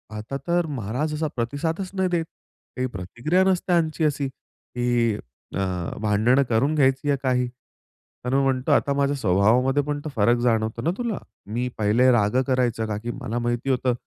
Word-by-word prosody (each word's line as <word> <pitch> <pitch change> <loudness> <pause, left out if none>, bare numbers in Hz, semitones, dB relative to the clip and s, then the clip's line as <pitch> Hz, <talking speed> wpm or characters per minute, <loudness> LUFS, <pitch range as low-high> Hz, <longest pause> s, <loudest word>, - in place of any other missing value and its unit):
आता 110 +6 -5
तर 175 0 +2
महाराज 135 +3 -2
असा 155 +1 -1
प्रतिसादच 150 +10 -2
नाही 190 -1 0
देत, 170 -2 0 0.5
काही 130 0 -1
प्रतिक्रिया 120 - 0
नसते 190 -1 +1
ह्यांची 160 -1 +1
अशी 145 -2 0
की 120 -3 -2 0.4
अ, - - -1 0.4
भांडणं 110 +6 +3
करून 125 +6 +2
घ्यायची 135 0 +2
आहे 140 - +3
काही. 125 -1 +1 0.8
तर 125 - -1
मी 140 - +4
म्हणतो 130 -1 +1
आता 140 - +3
माझ्या 140 0 +1
स्वभावामध्ये 120 +7 +3
पण 145 0 -2
तो - - -2
फरक 120 +2 +3
जाणवतो 110 -2 +1
ना 165 - 0
तुला? 235 -5 -2 0.3
मी 120 +5 -2
पहिले 110 +5 +4
राग 105 -2 +2
करायचं 125 -4 +1
का 105 -1 -2
की 120 - -2
मला 120 -1 -2
माहिती 120 +2 -1
होतं 130 -1 +2
130 Hz, 170 wpm, -24 LUFS, 115-145 Hz, 0.8 s, मी